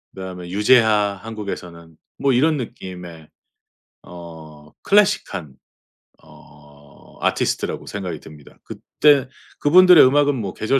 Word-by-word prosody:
그 95 - -9
다음에 90 -2 -8
유재하 105 0 +2
한국에서는 90 -7 -9 0.2
뭐 135 -1 0
이런 150 +5 +2
느낌의 90 - -9 0.7
어 80 -3 -13
클래식한 185 - 0 0.7
어 75 -1 -20
아티스트라고 - - -2
생각이 90 -6 -6
듭니다. 75 -2 -16
그때 140 -3 +1 0.3
그분들의 180 +2 +6
음악은 145 +2 +2
뭐 100 -7 -5
계절 135 +5 0
95 Hz, 265 characters per minute, -20 LUFS, 80-130 Hz, 0.7 s, 그분들의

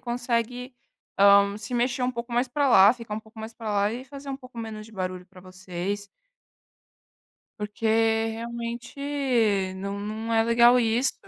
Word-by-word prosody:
consegue, 245 +1 -2 0.4
hã, 200 0 +6
se 215 +4 -6
mexer 245 +1 0
um 250 - +1
pouco 235 0 -6
mais 245 +2 +1
pra 285 +3 +1
lá, 200 -2 +7
ficar 230 -3 -7
um 220 - -4
pouco 220 +1 -18
mais 220 +1 -7
para 225 -2 -6
lá 205 +1 +1
e 250 +2 -6
fazer 275 +1 -9
um 270 - -3
pouco 255 -2 -16
menos 220 -1 -6
de 225 - -16
barulho 185 -2 -5
para 185 -1 -16
vocês. 185 +2 -5 1.5
Porque 210 +2 -4 0.5
realmente 235 -2 -1
não 200 +1 -4
não 220 +2 -4
é 225 - +4
legal 235 +1 +5
isso. 240 +3 +1
225 Hz, 165 wpm, -26 LUFS, 205-245 Hz, 1.5 s, lá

